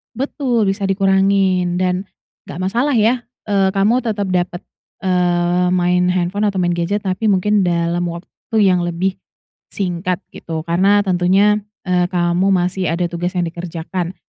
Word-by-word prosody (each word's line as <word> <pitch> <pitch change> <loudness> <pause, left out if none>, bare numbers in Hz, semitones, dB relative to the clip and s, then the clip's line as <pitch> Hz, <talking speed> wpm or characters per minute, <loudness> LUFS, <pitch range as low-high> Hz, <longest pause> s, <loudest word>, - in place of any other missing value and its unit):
Betul, 255 -2 -1
bisa 195 0 -2
dikurangin 195 -2 +2
dan 180 +1 -1 0.4
enggak 175 - -7
masalah 255 +6 +1
ya, 235 +2 +2 0.2
eee, 195 -1 +2
kamu 205 +5 +3
tetap 210 -5 -2
dapat, 175 0 -1 0.4
eee, 180 -1 +1
main 180 0 +2
handphone 180 +3 0
atau 195 -3 0
main 175 - +1
gadget 175 +4 -1
tapi 190 +3 -2
mungkin 205 0 +2
dalam 170 0 0
waktu 170 +6 -7
yang 180 -3 +3
lebih 180 +2 -2 0.6
singkat 180 0 -2
gitu, 160 -1 -6
karena 190 +5 +3
tentunya, 190 +2 +3 0.2
eee, 180 -1 +1
kamu 175 +1 0
masih 185 +1 0
ada 175 0 -1
tugas 175 +1 -3
yang 180 - 0
dikerjakan. 175 +1 -5
185 Hz, 145 wpm, -18 LUFS, 175-200 Hz, 0.6 s, kamu